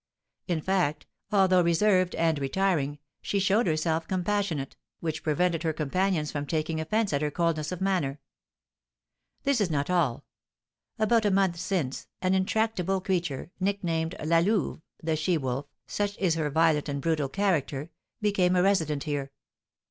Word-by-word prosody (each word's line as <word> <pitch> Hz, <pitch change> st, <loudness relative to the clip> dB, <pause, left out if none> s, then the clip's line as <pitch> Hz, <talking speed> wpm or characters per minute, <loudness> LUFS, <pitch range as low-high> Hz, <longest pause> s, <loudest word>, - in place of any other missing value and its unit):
In 170 Hz, -4 st, 0 dB
fact, 175 Hz, -5 st, 0 dB, 0.3 s
although 190 Hz, -3 st, +5 dB
reserved 185 Hz, +2 st, +3 dB
and 165 Hz, -2 st, +1 dB
retiring, 145 Hz, 0 st, 0 dB, 0.2 s
she 200 Hz, -, -1 dB
showed 200 Hz, +5 st, +2 dB
herself 160 Hz, 0 st, 0 dB
compassionate, 185 Hz, -6 st, -1 dB, 0.2 s
which 160 Hz, -2 st, -3 dB
prevented 165 Hz, +2 st, +1 dB
her 160 Hz, -2 st, 0 dB
companions 155 Hz, +1 st, 0 dB
from 145 Hz, -1 st, -4 dB
taking 160 Hz, 0 st, -1 dB
offence 210 Hz, +4 st, 0 dB
at 140 Hz, -, +1 dB
her 150 Hz, -, +1 dB
coldness 155 Hz, 0 st, -1 dB
of 180 Hz, 0 st, -5 dB
manner. 175 Hz, -8 st, 0 dB, 1.2 s
This 275 Hz, -5 st, +2 dB
is 195 Hz, -, +1 dB
not 145 Hz, +1 st, -1 dB
all: 160 Hz, -10 st, +1 dB, 0.7 s
about 220 Hz, +1 st, +3 dB
a 205 Hz, -, +3 dB
month 190 Hz, -3 st, +2 dB
since, 165 Hz, -8 st, -2 dB
an 185 Hz, 0 st, +1 dB
intractable 190 Hz, -1 st, +1 dB
creature, 175 Hz, -5 st, -2 dB
nicknamed 180 Hz, -4 st, -1 dB
La 165 Hz, +1 st, +4 dB
Louve 190 Hz, -2 st, 0 dB, 0.2 s
(the 160 Hz, 0 st, +1 dB
she 160 Hz, +3 st, +1 dB
wolf), 135 Hz, 0 st, -3 dB, 0.2 s
such 205 Hz, 0 st, -2 dB
is 185 Hz, -4 st, +2 dB
her 160 Hz, -2 st, -1 dB
violent 155 Hz, -1 st, +2 dB
and 140 Hz, 0 st, -2 dB
brutal 150 Hz, -2 st, 0 dB
character, 165 Hz, -5 st, -1 dB, 0.3 s
became 190 Hz, -4 st, +2 dB
a 180 Hz, -, +4 dB
resident 160 Hz, -7 st, +1 dB
here. 145 Hz, -2 st, -3 dB
170 Hz, 150 wpm, -28 LUFS, 155-190 Hz, 1.2 s, although